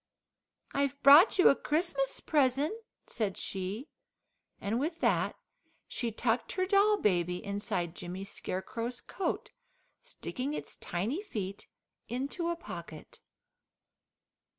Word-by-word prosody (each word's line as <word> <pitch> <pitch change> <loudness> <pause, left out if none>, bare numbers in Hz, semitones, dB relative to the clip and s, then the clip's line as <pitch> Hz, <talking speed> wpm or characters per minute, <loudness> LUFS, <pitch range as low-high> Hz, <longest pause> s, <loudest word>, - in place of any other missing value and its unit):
"I've 280 0 0
brought 295 +10 +9
you 365 - +8
a - - +5
Christmas 300 -3 0
present," 285 - +2 0.3
said 205 -4 -2
she, 195 - -3 0.7
and 220 +4 -1
with 325 +4 -2
that - - +2 0.5
she 235 -2 -2
tucked 230 +1 0
her 370 -1 +1
doll 405 +2 +4
baby 180 - +1
inside 200 -4 -2
Jimmy 180 +2 -6
Scarecrow's 230 +5 -4
coat, 385 - -3 0.5
sticking 290 - -4
its - - -6
tiny 215 - -2
feet 200 - -5 0.4
into 280 +8 -2
a 340 - 0
pocket. 170 - -9
250 Hz, 110 wpm, -31 LUFS, 195-310 Hz, 0.7 s, brought